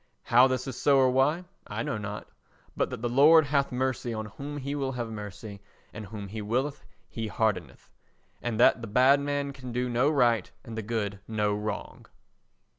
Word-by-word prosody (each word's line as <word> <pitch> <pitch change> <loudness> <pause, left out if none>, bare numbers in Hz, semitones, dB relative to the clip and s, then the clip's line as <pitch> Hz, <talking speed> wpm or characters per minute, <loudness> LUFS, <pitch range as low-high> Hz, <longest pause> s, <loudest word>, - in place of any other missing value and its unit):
How 125 +2 +6
this 130 -1 -2
is 130 - -5
so 140 +1 +3
or 130 -1 +4
why, 145 +7 +2 0.2
I 105 +3 -3
know 110 - -3
not, 105 0 -6 0.5
but - - 0
that 110 - -7
the - - +1
Lord 150 +6 +6
hath 140 0 +1
mercy 125 -2 -2
on 110 0 -4
whom 140 +8 -7
He 140 0 -4
will 135 -2 -2
have 120 -2 -4
mercy 105 -1 -8 0.3
and 105 -1 -7
whom 100 -1 -7
He 110 +2 -5
willeth 130 +7 -2 0.2
He 115 -1 -5
hardeneth, 110 -1 -2 0.5
and 120 -2 -3
that 120 - +5
the 115 - -6
bad 130 +6 +5
man 140 0 -2
can 130 -2 -8
do 125 +1 -1
no 125 +4 +2
right 120 -9 +2
and 115 -3 -8
the 110 - -3
good 105 -2 -3
no 105 -2 0
wrong. 105 +1 -5
120 Hz, 190 wpm, -28 LUFS, 110-135 Hz, 0.5 s, How